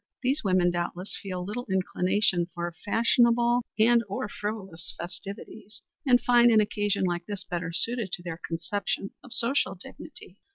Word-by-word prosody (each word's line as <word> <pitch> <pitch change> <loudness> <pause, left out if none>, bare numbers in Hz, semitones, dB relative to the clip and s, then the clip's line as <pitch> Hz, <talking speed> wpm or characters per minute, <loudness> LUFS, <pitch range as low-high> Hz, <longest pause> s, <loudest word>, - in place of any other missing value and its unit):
These 270 +4 +1
women 185 -3 +3
doubtless 175 +2 -3
feel 185 -2 -4
little 235 +5 -5
inclination 185 -1 +1
for 175 0 -3
fashionable 235 +2 +3 0.2
and 230 +2 +5
or 200 - -3
frivolous 195 -6 -6
festivities, 200 +4 -8 0.2
and 245 -1 +6
find 240 -1 +5
an 220 -2 +6
occasion 205 -1 0
like 175 -1 -1
this 200 -2 -5
better 175 -2 -4
suited 220 +4 +1
to 175 - -4
their 170 -1 -6
conception 195 +4 -3
of 250 - -13
social 245 +3 +2
dignity." - - -12
200 Hz, 150 wpm, -27 LUFS, 175-230 Hz, 0.2 s, and